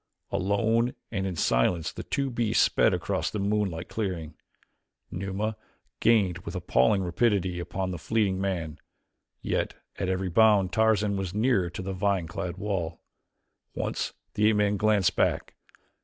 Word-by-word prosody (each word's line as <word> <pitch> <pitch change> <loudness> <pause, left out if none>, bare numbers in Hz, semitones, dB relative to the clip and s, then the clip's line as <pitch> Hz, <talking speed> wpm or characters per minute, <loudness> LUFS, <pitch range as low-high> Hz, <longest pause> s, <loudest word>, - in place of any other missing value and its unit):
Alone 115 +5 +1 0.2
and 95 -3 -1
in 90 - -3
silence 80 +3 +1
the - - -7
two 140 -1 -2
beasts 115 -2 +2
sped - - +3
across - - -1
the - - -4
moonlit 100 -4 -1
clearing. 90 -7 -3 0.8
Numa 100 +4 -3 0.4
gained 105 -6 +3
with - - -7
appalling 95 +10 +2
rapidity 95 -1 +1
upon 95 +2 -3
the 90 - -5
fleeing 100 0 0
man, 85 -5 -3 0.6
yet - - -1 0.2
at 95 - -1
every 95 0 -1
bound 100 -2 +4
Tarzan 105 -2 +2
was 95 -1 -4
nearer 105 -5 +2
to 95 - -6
the 95 +1 -3
vine 95 -2 0
clad 85 +1 -5
wall. 90 -6 -3 0.7
Once - - -2 0.2
the 105 +1 +3
ape 110 - +2
man 105 0 +2
glanced 105 -2 +2
back. - - 0
95 Hz, 145 wpm, -27 LUFS, 90-105 Hz, 0.8 s, bound